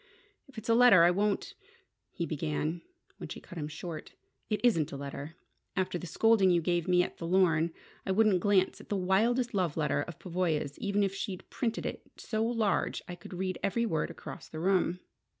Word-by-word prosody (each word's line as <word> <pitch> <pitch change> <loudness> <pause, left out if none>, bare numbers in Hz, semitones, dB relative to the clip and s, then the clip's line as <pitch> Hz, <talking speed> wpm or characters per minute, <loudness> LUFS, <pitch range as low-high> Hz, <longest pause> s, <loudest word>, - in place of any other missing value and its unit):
"If 275 - -18
it's 220 - -7
a 230 - +4
letter, 230 -7 +7
I 175 - +6
won't 200 +2 0 0.3
" - - -50
he 170 - -2
had 165 - -4
begun 155 +2 -2 0.4
when - - -8
she - - -6
cut 175 - -9
him 150 - -3
short. 155 +1 -7 0.4
"It 215 - 0
isn't 170 - +3
a 140 - -5
letter! 140 +2 -7 0.4
After 185 -2 -1
the 180 - -7
scolding 215 +3 +4
you 175 -1 +4
gave 175 0 0
me 180 -1 +4
at - - -6
the 165 - -4
Lorne, 170 -3 +3 0.3
I 190 - -2
wouldn't 205 -2 +4
glance 190 0 +2
at - - -16
the 205 - 0
wildest 230 +7 +2
love 180 -6 0
letter 150 -2 +1
of 170 +2 -7
Pavoya's 165 -6 -2
even 200 0 +1
if 195 -1 0
she'd 195 -1 -5
printed 235 -3 -2
it - - -4 0.2
so 220 0 -2
large 225 -3 0
I 175 - -6
could 175 +1 -10
read 185 0 -2
every 230 +4 +1
word 160 -8 -1
across 170 - -9
the 155 - -7
room." 180 0 +1
185 Hz, 205 wpm, -30 LUFS, 165-205 Hz, 0.4 s, letter